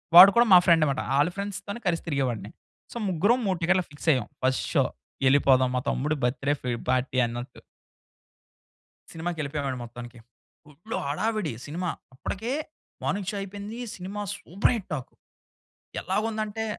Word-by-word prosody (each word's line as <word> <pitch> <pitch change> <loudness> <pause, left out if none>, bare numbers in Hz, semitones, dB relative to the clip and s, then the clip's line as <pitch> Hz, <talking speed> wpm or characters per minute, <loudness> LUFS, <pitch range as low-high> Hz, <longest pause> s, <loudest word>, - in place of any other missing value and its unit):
వాడు 190 +3 +12
కూడా 240 +1 +6
మా - - +12
ఫ్రెండ్ 165 -3 +5
మాట. 135 - -1 0.2
ఆళ్ళ 150 +4 +4
ఫ్రెండ్స్‌తోనే 200 +2 -5
కలిసి 170 -2 0
తిరిగేవాడిని. 125 -8 -1 0.4
సో, - - -6
ముగ్గురం 200 +8 +3
3 190 -2 +1
టికెట్లు 185 +2 +3
ఫిక్స్ 145 - -11
అయ్యాం. 125 -5 -1 0.2
ఫస్ట్ 130 0 +1
షో - - +4 0.4
ఎళ్ళిపోదాం 130 -2 +5
మా 125 - +1
తమ్ముడు 150 +3 0
బర్త్‌డే 135 +3 +1
ఫ్రీ 125 - -2 0.2
పార్టీ 130 0 0
అన్నట్టు. 120 +1 -6 1.5
సినిమాకెళ్ళిపోయావండి 150 -5 -3
మొత్తానికి. 120 +1 -9 0.5
ఫుల్లు 165 +10 -7
హడావిడి 205 - -1
సినిమా. 175 +4 -3 0.3
అప్పటికే 220 - -4 0.5
మార్నింగ్ 195 -1 -1
షో - - -6
అయిపోయింది. 205 +4 -7 0.2
Cinema 195 +3 -6
super 190 +9 0
hit 210 -5 -6
talk. 135 -5 -5 0.9
ఎలాగుందంటే 215 +2 -2
165 Hz, 135 wpm, -27 LUFS, 135-200 Hz, 1.5 s, వాడు